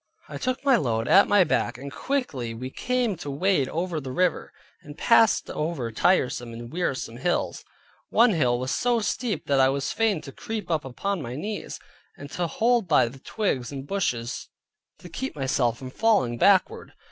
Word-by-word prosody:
I -, -, -7 dB
took 255 Hz, +2 st, -2 dB
my 270 Hz, -3 st, +5 dB
load 115 Hz, -, -1 dB
at 195 Hz, -, +6 dB
my 205 Hz, -2 st, +5 dB
back, 120 Hz, -7 st, 0 dB
and 140 Hz, +2 st, -8 dB
quickly 140 Hz, -, -3 dB
we 130 Hz, +3 st, -6 dB
came 250 Hz, -, -1 dB
to 150 Hz, -3 st, -7 dB
wade 145 Hz, -1 st, +1 dB
over 170 Hz, -1 st, -2 dB
the 130 Hz, -1 st, -6 dB
river; 180 Hz, +5 st, 0 dB, 0.3 s
and 145 Hz, 0 st, -12 dB
passed 225 Hz, -2 st, +4 dB
over 150 Hz, -7 st, -3 dB
tiresome 120 Hz, -3 st, +1 dB
and 120 Hz, +3 st, -9 dB
wearisome 135 Hz, -9 st, -2 dB
hills. 175 Hz, +7 st, -1 dB, 0.5 s
One 235 Hz, 0 st, +5 dB
hill 125 Hz, -9 st, +2 dB
was 130 Hz, +1 st, -3 dB
so 240 Hz, -1 st, +1 dB
steep 225 Hz, +1 st, -2 dB
that 140 Hz, -1 st, +2 dB
I 130 Hz, 0 st, +5 dB
was 135 Hz, 0 st, -1 dB
fain 220 Hz, -6 st, +1 dB
to 135 Hz, -, -9 dB
creep 215 Hz, +4 st, -5 dB
up 155 Hz, -3 st, 0 dB
upon 180 Hz, +9 st, -3 dB
my 120 Hz, -1 st, -6 dB
knees, 205 Hz, +9 st, -5 dB, 0.4 s
and 140 Hz, 0 st, -10 dB
to 175 Hz, -1 st, -2 dB
hold 230 Hz, +3 st, +1 dB
by 145 Hz, -7 st, +4 dB
the 135 Hz, +3 st, -13 dB
twigs 140 Hz, -, -2 dB
and 135 Hz, -1 st, -6 dB
bushes 125 Hz, -10 st, -2 dB, 0.5 s
to -, -, -12 dB
keep 175 Hz, +6 st, -5 dB
myself 130 Hz, -4 st, 0 dB
from 130 Hz, 0 st, -8 dB
falling 195 Hz, -, +1 dB
backward. 195 Hz, -2 st, +3 dB
155 Hz, 180 wpm, -25 LUFS, 130-205 Hz, 0.5 s, at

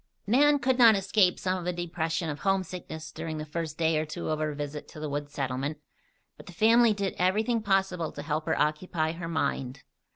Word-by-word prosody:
Nan 290 Hz, +7 st, +4 dB
could 260 Hz, -1 st, 0 dB
not 230 Hz, -3 st, +8 dB
escape 195 Hz, -1 st, +2 dB
some 185 Hz, 0 st, -1 dB
of -, -, -7 dB
the 180 Hz, -, 0 dB
depression 170 Hz, -1 st, -2 dB
of 150 Hz, -2 st, -4 dB
homesickness 180 Hz, -5 st, -3 dB
during 155 Hz, 0 st, -5 dB
the 155 Hz, -, -4 dB
first 155 Hz, 0 st, -4 dB
day 160 Hz, -1 st, +2 dB
or -, -, 0 dB
two 155 Hz, -, -5 dB
of 155 Hz, -, -1 dB
her 155 Hz, -1 st, -2 dB
visit 145 Hz, 0 st, -5 dB
to -, -, -11 dB
the 155 Hz, -, -3 dB
woods 145 Hz, 0 st, -4 dB
settlement; 135 Hz, +2 st, -3 dB, 0.6 s
but -, -, -14 dB
the 180 Hz, -, -10 dB
family 230 Hz, +5 st, +5 dB
did 200 Hz, -2 st, -1 dB
everything 220 Hz, +6 st, +2 dB
possible 190 Hz, -5 st, 0 dB
to 145 Hz, -, -7 dB
help 155 Hz, +1 st, -2 dB
her -, -, +1 dB
occupy 155 Hz, +1 st, 0 dB
her 165 Hz, 0 st, -6 dB
mind. 135 Hz, -5 st, -2 dB
165 Hz, 205 wpm, -28 LUFS, 155-195 Hz, 0.6 s, not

